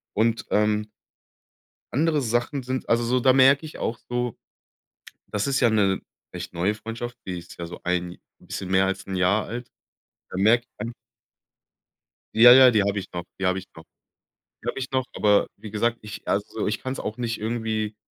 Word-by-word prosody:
Und, 110 0 +1
ähm 105 0 +2 1.1
andere 155 +1 +2
Sachen 120 +4 -1
sind 130 +1 -4
also 115 +1 +3
so, 125 +2 +2
da 130 +1 +5
merke 135 +3 +5
ich 155 - -10
auch 115 - -2
so 120 -1 -2 0.9
das 105 -1 -1
ist 135 -1 +1
ja 120 - +4
'ne 100 -3 +2 0.3
recht 90 0 -6
neue 90 +4 0
Freundschaft, 115 +3 -6
die 90 -2 -3
ist 85 0 -12
ja 85 - -4
so 85 - -9
ein 90 0 -1 0.2
bisschen 95 - -6
mehr 95 0 +4
als 95 - -2
Jahr 95 +2 +1
alt. 120 +1 -6 0.6
Da - - -6
merke 110 +5 +4
ich - - -47
einfach 120 0 -4 1.4
Ja, 120 +2 +9
ja, 130 -1 +9
die 110 -4 +3
habe 100 0 0
ich 95 - -7
noch, 85 -1 -4
die 95 - -3
habe 95 0 +2
ich 95 - -8
noch, 80 - -11 0.8
habe - - -2
ich 130 0 -3
noch. 130 -1 +1
Aber 105 -1 +3
wie 105 0 -10
gesagt, 115 +2 0
ich 105 -1 -9
also - - +1
so - - 0
ich - - -2
kann's 130 +1 -4
auch 110 - -4
nicht 115 -2 -2
irgendwie, 110 -1 -2
110 Hz, 190 wpm, -25 LUFS, 100-120 Hz, 1.4 s, Ja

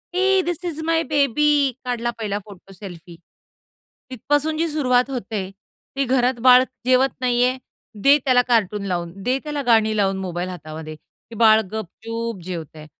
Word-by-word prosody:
"हे 385 0 +3
this 350 0 -3
is 315 +1 -7
my 330 0 +1
baby," 290 -1 +2
काढला 240 -1 -2
पहिला 205 -2 -2
फोटो 195 -1 -14
सेल्फी. 175 -3 -11 1.0
तिथपासून 290 +5 -1
जी 335 +1 0
सुरुवात 260 -4 +1
होते, 210 -6 -4 0.5
ती 275 - +1
घरात 250 -1 +1
बाळ 255 0 +7 0.2
जेवत 255 +1 +4
नाहीये, 250 +1 +1 0.5
दे 280 +1 +7
त्याला 250 -1 +4
कार्टून 210 -4 +1
लावून, 175 -2 -3
दे 255 +1 +1
त्याला 295 -1 -3
गाणी 220 -2 +3
लावून 195 -1 +1
मोबाईल 180 -1 -4
हातामध्ये. 155 -2 -8
ते 225 +8 -18
बाळ 220 0 +5
गपचूप 225 +1 -5
जेवतय. 160 -3 -7
235 Hz, 150 wpm, -21 LUFS, 195-270 Hz, 1.0 s, बाळ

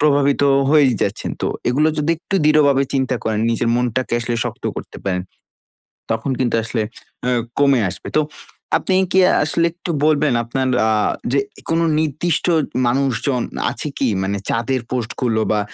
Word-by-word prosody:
প্রভাবিত 140 -1 +3 0.3
হয়েই 145 -4 +5
যাচ্ছেন। - - -2
তো - - +1 0.2
এগুলো 145 +6 +3
যদি 150 +2 +1
একটু 180 - -5
দৃঢ়ভাবে 145 -3 +4
চিন্তা 130 -1 +1
করেন, 110 -1 0
নিজের 115 0 0
মনটাকে 125 0 -1
আসলে 120 0 -2
শক্ত - - -6
করতে - - -7
পারেন, 90 -2 -1 0.9
তখন 115 +4 -1
কিন্তু 125 -2 +1
আসলে 115 0 -2 0.4
অ্যাঁ 125 -1 +1 0.2
কমে 140 -3 +4
আসবে। - - -8
তো 155 - +5 0.5
আপনি 190 - 0 0.2
কি 190 - +3 0.3
আসলে 165 +2 +1
একটু 175 +1 -7
বলবেন, 150 -2 +3
আপনার 130 +3 -1 0.2
আ - - +2 0.4
যে, 140 - +3 0.3
কোন 165 0 +2 0.2
নির্দিষ্ট 160 +2 0 0.4
মানুষজন 130 0 0 0.3
আছে - - -4
কি? 135 - +1
মানে 100 +1 -1
চাঁদের 120 +3 0
পোস্টগুলো, 120 -1 -1
বা 105 - +2
130 Hz, 150 wpm, -19 LUFS, 120-150 Hz, 0.9 s, হয়েই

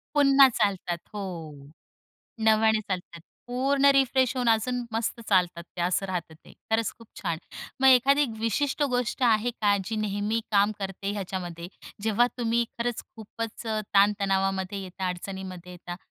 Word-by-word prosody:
पुन्हा 275 -1 +7
चालतात 190 -6 -1 0.2
हो. 205 - -4 1.2
नव्याने 220 0 +3
चालतात, 180 -4 -5 0.3
पूर्ण 270 +3 0
रिफ्रेश 260 -2 +3
होऊन 245 -2 +1
अजून 245 +3 +1
मस्त 225 +1 -2
चालतात 180 -3 +2
ते. - - -4
असं 185 +2 0
राहतं 175 -4 -4
ते. 155 - -18 0.2
खरंच 225 -1 +1
खूप 230 - -15 0.2
छान. 170 -4 -1 0.4
मग 265 - +4
एखादी 270 +3 +5
विशिष्ट 265 +7 0
गोष्ट 245 +1 -1
आहे 230 0 +3
का, 205 -4 +1
जी 220 +3 -4
नेहमी 215 +1 -1
काम 205 0 +3
करते 195 0 -4
ह्याच्यामध्ये? 180 -3 -5 0.3
जेव्हा 225 +3 +3
तुम्ही 235 0 +1
खरंच 235 0 -2
खूपच 225 +1 -7
अ, 220 -1 -1
ताण-तणावामध्ये 195 -1 +2
येता, 185 0 -4
अडचणीमध्ये 180 0 -7
येता. 175 0 -8
215 Hz, 140 wpm, -27 LUFS, 190-235 Hz, 1.2 s, पुन्हा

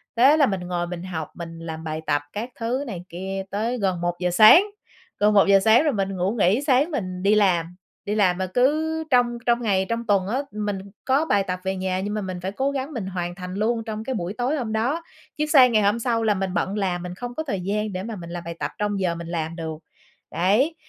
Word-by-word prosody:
thế 270 +6 +6
là 285 - +5
mình 195 -4 -1
ngồi 175 -1 -2
mình 175 0 -6
học, 160 -5 -4
mình 165 -1 -8
làm 160 -1 -6
bài 155 0 -4
tập 145 -1 +2
các 225 +5 -4
thứ 245 +5 -1
này 180 -5 -6
kia 190 +3 -4
tới 225 +5 -1
gần 190 -5 -1
1:00 175 +1 -1
sáng, 215 - +8 0.6
gần 210 +1 +4
1:00 200 -1 +6
sáng, 220 +8 +5
rồi 300 -4 +1
mình 195 -1 -1
ngủ 185 +3 0
nghỉ 215 +2 +2
sáng 275 +5 +3
mình 185 -8 -4
đi 205 +2 +4
làm. 180 -4 +2 0.3
Đi 210 +1 -1
làm 185 -4 +3
mà 190 0 -2
cứ 310 - +1
trong 240 -1 +3
trong 240 0 +2
ngày 190 -4 +1
trong 230 0 -2
tuần 195 -2 +2
á 255 +6 0
mình 210 -2 -3 0.3
có 275 +4 +2
bài 205 -9 +2
tập 185 -1 -4
về 190 0 -1
nhà 185 0 -2
nhưng 205 +2 -3
mà 215 - -2
mình 185 -2 -5
phải 190 +2 -3
cố 270 +6 -1
gắng 275 +2 -4
mình 210 -6 -4
hoàn 175 -2 -4
thành 180 0 -7
luôn 225 +3 0
trong 220 -1 -5
cái 260 +3 -3
buổi 180 0 -3
tối 250 +6 -1
hôm 230 -5 -3
đó, 265 +10 0 0.3
chứ 300 - +1
sang 265 -5 +6
ngày 215 -2 +3
hôm 210 +3 +2
sau 230 -1 0
là 215 -1 +3
mình 190 -1 -3
bận 195 +3 -1
làm 180 -3 -1
mình 180 0 -6
không 245 +3 -7
có 315 - -2
thời 200 -11 -3
gian 210 +2 -2
để 185 - -4
mà 225 0 -5
mình 170 -2 -9
làm 175 0 -6
bài 170 - -5
tập - - -2
trong 205 -1 -1
giờ 175 -3 0
mình 170 0 -7
làm 165 -1 -3
được. 160 -2 -5 0.5
Đấy, 215 - +2
200 Hz, 250 wpm, -23 LUFS, 180-235 Hz, 0.6 s, sáng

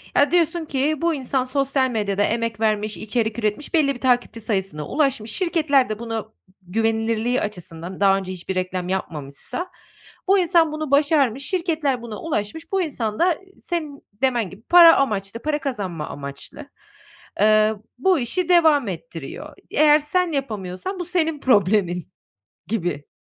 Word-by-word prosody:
Ya, 285 +3 +4
diyorsun 340 -1 +2
ki, 290 +1 -1
bu 335 0 +2
insan 265 -2 -1
sosyal 265 0 0
medyada 205 -4 0
emek 230 0 -1
vermiş, 215 -1 0
içerik 220 +1 -2
üretmiş, 215 +6 -2
belli 285 -4 +3
bir 245 - -12
takipçi 245 -3 +1
sayısına 190 -9 -2
ulaşmış, 270 -7 0
şirketler 310 - +2
de 215 0 -4
buna 225 -2 -4 0.4
güvenilirliği 225 +4 0
açısından, 180 -2 -6
daha 195 -1 +5
önce 190 -1 -5
hiçbir 185 +1 -5
reklam 185 -1 -2
yapmamışsa, 165 - -4 0.6
bu 390 +1 +5
insan 335 -3 +3
bunu 310 -2 -4
başarmış, 280 -3 +3
şirketler 320 -8 -1
buna 225 -3 -7
ulaşmış, 320 +2 -3
bu 390 -1 +1
insan 230 -10 -3
da 345 -2 +3 0.2
senin 310 -5 -4 0.2
demen 240 -7 +1
gibi 195 +3 -13
para 335 +5 +8
amaçlı, 210 -4 -1
para 300 -1 -1
kazanma 200 - -4
amaçlı, 140 0 -8 0.7
ııı, 215 0 +3
bu 360 +6 +3
işi 335 +9 -1
devam 315 - +5
ettiriyor. 190 +7 -7 0.2
Eğer 300 -1 +6
sen 345 +3 0
yapamıyorsan 230 - -4
bu 355 - -3
senin 325 -4 0
problemin 200 -7 +2 0.6
gibi. 175 -9 -3
245 Hz, 145 wpm, -22 LUFS, 205-305 Hz, 0.7 s, para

